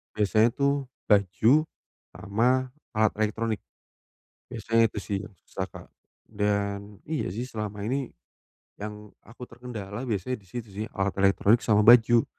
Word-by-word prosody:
biasanya 110 +2 +3
tu 140 -1 +1 0.2
baju 110 - +3 0.5
sama 125 +5 +1 0.2
alat 110 -1 +3
elektronik. 110 0 -1 0.9
Biasanya 115 -1 +2
itu - - -11
sih 100 0 -3
yang 105 - -11
susah, - - -4
Kak. - - -12 0.4
Dan, 100 -1 -2
iya 155 -1 -2
sih, 110 +7 -4
selama 105 -4 -5
ini 130 +2 -2 0.7
yang 105 0 -8
aku 120 +3 -10
terkendala 115 -4 -7
biasanya 115 +3 -2
di 95 - -23
situ 120 +1 -6
sih, 105 +2 -4
alat 95 0 0
elektronik 100 +3 +4
sama 105 -1 +3
baju 120 0 +7
110 Hz, 135 wpm, -27 LUFS, 105-120 Hz, 0.9 s, baju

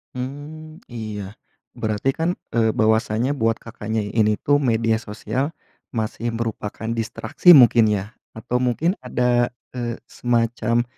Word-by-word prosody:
Mmm, 150 +5 -7
iya. 110 -3 -5 0.5
Berarti 110 +4 -1
kan 160 +4 -1 0.2
eee, 110 -2 +2
bahwasanya 110 +2 +2
buat 115 -5 +1
Kakaknya 110 -1 -3
ini 105 +1 +2
tuh 145 +6 +2
media 115 -4 +1
sosial 120 +7 -3 0.4
masih 110 +1 -2
merupakan 110 -1 -4
distraksi 115 +9 +4
mungkin 120 -4 +7
ya? 105 -2 0 0.3
Atau 120 +2 -2
mungkin 130 - 0
ada, 120 0 +1 0.2
eee, 120 -2 -3 0.2
semacam 115 -1 +1
115 Hz, 120 wpm, -22 LUFS, 110-125 Hz, 0.5 s, mungkin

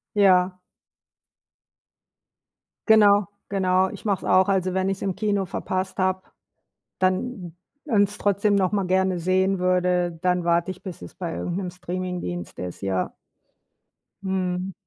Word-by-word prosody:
Ja. 185 -2 +5 2.4
Genau, 205 -3 +6 0.2
genau. 190 -1 +2
Ich - - -10
mache 200 -3 -1
es - - 0
auch. 190 +1 +5
Also, 185 -2 +1
wenn 190 0 +1
ich 195 0 -1
es - - -11
im 190 -2 -1
Kino 205 -3 0
verpasst 185 +1 -3
habe, 185 0 +1 0.8
dann 185 -1 -1 0.3
und 205 -3 +3
es 205 - -9
trotzdem 205 +1 +2
noch 190 -2 +2
mal 200 -3 0
gerne 185 0 +1
sehen 185 +3 +1
würde, 180 -2 +1
dann 180 -1 +1
warte 170 +1 +1
ich, 185 - -7
bis 185 -3 -8
es - - -10
bei 170 -3 -4
irgend 175 0 -3
'nem 185 -2 -3
Streamingdienst 180 - -5
ist, 90 -1 -6
ja. 95 -2 -1 1.1
Mhm. 185 -1 -2
185 Hz, 145 wpm, -24 LUFS, 180-195 Hz, 2.4 s, Genau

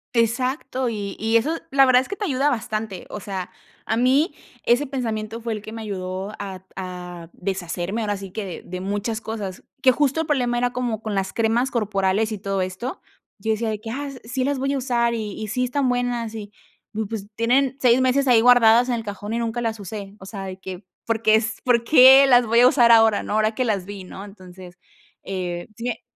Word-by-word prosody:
Exacto, 255 +2 0
y 205 -3 -4
y 225 +2 +3
eso 265 +8 0 0.2
la 270 0 +6
verdad 255 -1 +5
es 260 - -9
que 405 - -4
te 420 - -2
ayuda 280 -3 +1
bastante, 220 -5 -3
o 210 - -7
sea, 190 -2 -5 0.4
a 220 - 0
mí 265 - +2 0.3
ese 245 +5 +3
pensamiento 225 -5 -4
fue 230 -1 -3
el 210 - -5
que 215 - -9
me 225 0 -7
ayudó 190 0 -5
a 190 -2 -7
a 180 -2 -7
deshacerme, 185 +3 -3
ahora 205 -2 -1
sí 195 -1 -9
que 195 -4 -6
de 180 +1 -7
muchas 205 +3 -3
cosas 210 -5 -6 0.2
que 260 - +6
justo 290 +3 +1
el 320 - -4
problema 245 -5 +1
era 245 0 0
como 240 -4 -2
con 215 -2 -3
las 195 -1 -1
cremas 235 +3 +1
corporales 210 -1 0
y 215 - -4
todo 195 -1 -2
esto, 185 - -4 0.4
yo 220 - -1
decía 220 +1 -1
de 215 -1 -3
que: 225 +1 -8
"Ah, 280 +5 -4 0.2
sí, 255 +3 -2
las 280 0 0
voy 275 +1 0
a - - 0
usar 240 -2 +1
y 215 -3 -3
y 215 - -4
sí 250 +4 -1
están 255 +2 0
buenas", 245 -2 -1
y 210 -2 -7 0.6
pues, 210 -3 -6
tienen 255 +4 +2
6 250 0 +4
meses 265 +2 +2
ahí 240 -3 +6
guardadas 245 0 +6
en 245 - +1
el 230 - -4
cajón 205 0 -6
y 230 - -1
nunca 235 0 -2
las 225 -2 -2
usé, 200 +1 -8
o 190 - -11
sea, 195 0 -7
de 190 0 -7
que, 190 0 -8 0.2
¿por 225 -1 -1
qué 220 -1 +5
es, 225 +1 -1
por 235 -2 +2
qué 265 0 +8
las 245 -2 +5
voy 230 +1 +3
a 245 - +8
usar 240 -3 +5
ahora, 225 -2 +5
no?, - - -6
ahora 215 0 +1
que 255 - 0
las 205 -6 -1
vi, 200 -1 -8
¿no? 190 +2 -9
entonces, 185 -3 -13 0.5
eh, 180 -2 -4
sí 230 - -6
me 240 -2 -3
225 Hz, 225 wpm, -23 LUFS, 200-245 Hz, 0.6 s, qué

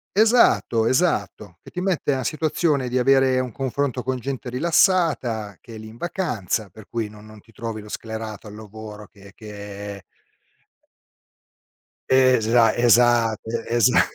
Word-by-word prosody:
Esatto, 215 - +4
esatto, 105 - -1
che - - -13
ti 180 - -6
mette 180 -6 0
a 130 - -3
situazione 150 -1 0
di 125 - -1
avere 130 0 +3
un 125 -1 -3
confronto 135 +1 -2
con 130 +1 -2
gente 130 0 -5
rilassata, 130 - +1
che 115 - -12
è - - -8
lì 110 0 -10
in 115 - -14
vacanza, 115 - -3
per 100 +3 -15
cui 115 -2 -3
non 105 0 -14
non 110 0 -14
ti 115 - -22
trovi 115 0 -6
lo 105 - -13
sclerato 110 -1 -7
al 105 - -10
lavoro 105 0 -10
che 100 -1 -17
che 100 -1 -9 2.1
Esa 120 -3 +4
esatto, 120 -2 +3 0.2
e 120 - -1
esa 120 -3 +5
115 Hz, 150 wpm, -22 LUFS, 110-130 Hz, 2.1 s, esa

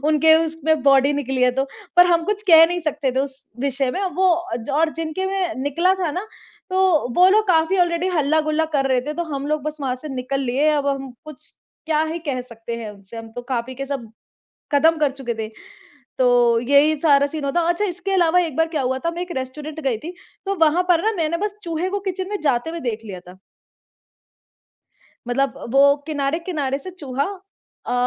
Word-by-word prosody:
उनके 315 +1 +5
उसमें 315 -2 -1
बॉडी 275 +1 +4
निकली 265 -2 -2
है 250 - +5
तो, 265 +2 -1 0.3
पर 355 0 +8
हम 335 -2 +2
कुछ 415 +1 -2
कह 325 -1 +9
नहीं 350 +1 -2
सकते 295 -5 -2
थे 260 - -1
उस 270 -1 -3 0.2
विषय 270 -1 0
में 370 - -3 0.2
वो 375 +1 +3 0.5
और 315 +3 +2
जिनके 330 +3 -3
में 380 -3 -1
निकला 335 +7 +2
था 365 -5 -2
ना, 365 +7 -4 0.4
तो 370 -7 +2
वो 360 +1 +7
लोग 425 +2 +3
काफ़ी 330 +2 +3
ऑलरेडी 350 0 +1
हल्ला-गुल्ला 310 +1 +1
कर 270 -1 +1
रहे 255 -1 +2
थे 300 - -2
तो 345 - -2
हम 275 0 -3
लोग 305 -1 -1
बस 305 +1 -5
वहाँ 260 -3 -1
से 305 +4 -9
निकल 260 +2 -2
लिए, 270 +3 +1
अब 290 -2 0
हम 270 -1 -2
कुछ 305 +1 -13 0.3
क्या 310 -1 +2
ही 340 - -3
कह 255 -2 -1
सकते 230 +1 -6
हैं 225 -2 -6
उनसे 200 +2 -13
हम 225 0 -8
तो 245 - -4
खा-पी 255 0 -3
के 275 +1 -5
सब 255 -6 -5 0.6
कदम 320 +3 +4
कर 295 -3 +1
चुके 265 -3 -5
थे। 220 -1 -4 0.7
तो 245 -2 +4
यही 285 +5 +4
सारा 285 -3 +4
सीन 295 0 -5
हुआ 280 - 0
था 345 - +4
अच्छा 345 +4 +1
इसके 375 0 -3
अलावा 360 -1 +4
एक 325 -6 -3
बार 325 0 +2
क्या 290 - 0
हुआ 260 +1 -1
था 335 - +1
मैं 345 +1 -5
एक 360 -1 -6
रेस्टोरेंट 295 +4 -6
गई 265 -6 0
थी 340 +8 -8 0.3
तो 395 - 0
वहाँ 320 +3 +3
पर 345 0 +3
न - - -5
मैंने 330 0 0
बस 410 +2 -3
चूहे 335 +1 -2
को 405 +1 -2
किचन 375 0 -4
में 415 - -3
जाते 280 0 0
हुए 335 0 -6
देख 230 -5 -4
लिया 190 -4 -8
था। 180 +1 -13 1.9
मतलब 270 +2 0 0.2
वो 280 +1 +5
किनारे-किनारे 295 -1 -2
से 330 +7 -8
चूहा 280 -6 -3 0.6
अ, - - -2
300 Hz, 210 wpm, -21 LUFS, 265-335 Hz, 1.9 s, कह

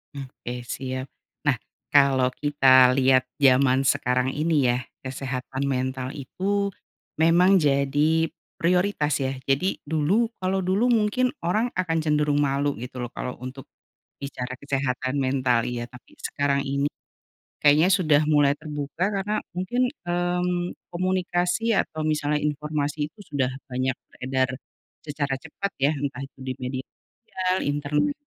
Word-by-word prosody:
Mmm 135 -2 -6
oke 120 -1 -7 0.2
siap. 130 0 -4 0.3
Nah, 145 -5 +2 0.3
kalau 135 -3 +4
kita 130 -3 +6
lihat 130 0 +4 0.2
zaman 130 -1 +5
sekarang 130 -2 +1
ini 150 -2 +1
ya, 120 - +2 0.2
kesehatan 130 0 -4
mental 130 0 -2
itu, 200 +8 -1 0.5
memang 175 +4 +5
jadi 150 +2 +2 0.2
prioritas 180 -3 +1
ya. 130 - -1 0.2
Jadi, 180 +8 +1
dulu 160 +10 +1
kalau 190 +1 0
dulu 190 +6 +1
mungkin 235 +4 +2
orang 215 +8 0
akan 175 -3 0
cenderung 150 -1 +2
malu 140 +1 0
gitu 125 +2 -7
loh 120 - -4
kalau 125 - -4
untuk, 130 +1 -7 0.5
bicara 130 -2 -5
kesehatan 135 0 -1
mental 130 -3 +1
iya, 120 -1 -3
tapi 125 0 -15
sekarang 140 -1 0
ini, 140 +1 0 0.7
kayaknya 150 +4 +5
sudah 155 -6 +4
mulai 145 -2 +3
terbuka, 150 +1 -4
karena 205 +2 -1 0.2
mungkin, 185 +8 -1 0.2
mmm, 175 0 -1 0.2
komunikasi 185 +4 0
atau 155 - -1
misalnya 150 -1 0
informasi 150 0 -2
itu 155 +8 -15
sudah 135 -3 0 0.2
banyak 130 +1 0 0.2
beredar, 130 0 -1 0.6
secara 140 -2 -2
cepat 165 +7 -5
ya, 140 +3 +3
entah 140 -2 -4
itu 135 - -20
di 130 0 -3
media 130 +1 -4 0.3
sosial, 185 -5 -2
internet. 145 - 0
145 Hz, 130 wpm, -25 LUFS, 130-175 Hz, 0.7 s, kita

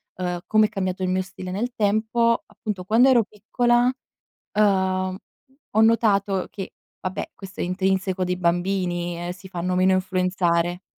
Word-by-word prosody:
uhm, 180 -1 -3
come 215 0 +4
è - - -1
cambiato 185 -2 -3
il 185 - 0
mio 185 0 +1
stile 185 -1 -8
nel 235 +6 -2
tempo, 220 +3 +1
appunto 210 -2 -6
quando 230 +7 +4
ero 240 -3 +5
piccola, 240 +4 +1 0.6
uhm, 190 -2 +2 0.6
ho 220 - +4
notato 200 -4 +3
che 195 -2 -7 0.3
vabbè, 185 0 -4
questo 190 -1 -11
è - - +1
intrinseco 190 0 0
dei 180 0 -1
bambini, 175 0 0
ehm, 175 0 -4
si 185 +1 -11
fanno 180 0 -2
meno 185 +1 +4
influenzare 180 -1 0
190 Hz, 155 wpm, -23 LUFS, 180-210 Hz, 0.6 s, ero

